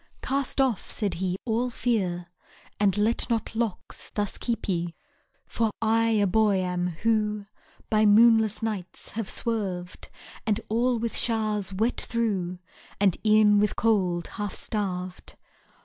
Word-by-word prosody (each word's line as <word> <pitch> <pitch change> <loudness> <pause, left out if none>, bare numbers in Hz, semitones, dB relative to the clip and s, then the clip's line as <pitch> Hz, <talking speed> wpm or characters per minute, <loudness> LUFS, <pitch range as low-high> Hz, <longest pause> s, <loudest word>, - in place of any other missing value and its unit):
Cast 275 0 -1
off, 260 -7 +1
said 205 -4 -2
he, 185 -1 0
all 240 +1 0
fear, 190 -8 -1 0.5
And 200 -1 +2
let 220 +4 +1
not 225 -1 -1
locks 225 -4 -3
thus 205 -1 -2
keep 235 -2 -2
ye. 175 -3 -1 0.5
For 225 -1 0
I 225 0 +2
a 215 -2 +3
boy 210 +1 +3
am, 180 -1 -1 0.2
who 210 -2 +1 0.4
By 215 -1 +3
moonless 220 0 +5
nights 205 -5 -4
have 225 -2 -4
swerved; 190 -6 -3 0.3
And 215 -1 +1
all 240 +3 +2
with 230 0 -3
show'rs 215 -4 +1
wet 220 +6 0
through, 200 -7 -1 0.4
And 195 -3 +3
e'en 215 -1 +5
with 210 0 +1
cold 185 -6 +1
half 205 -3 -5
starved. 185 -4 -4
210 Hz, 135 wpm, -26 LUFS, 190-225 Hz, 0.5 s, moonless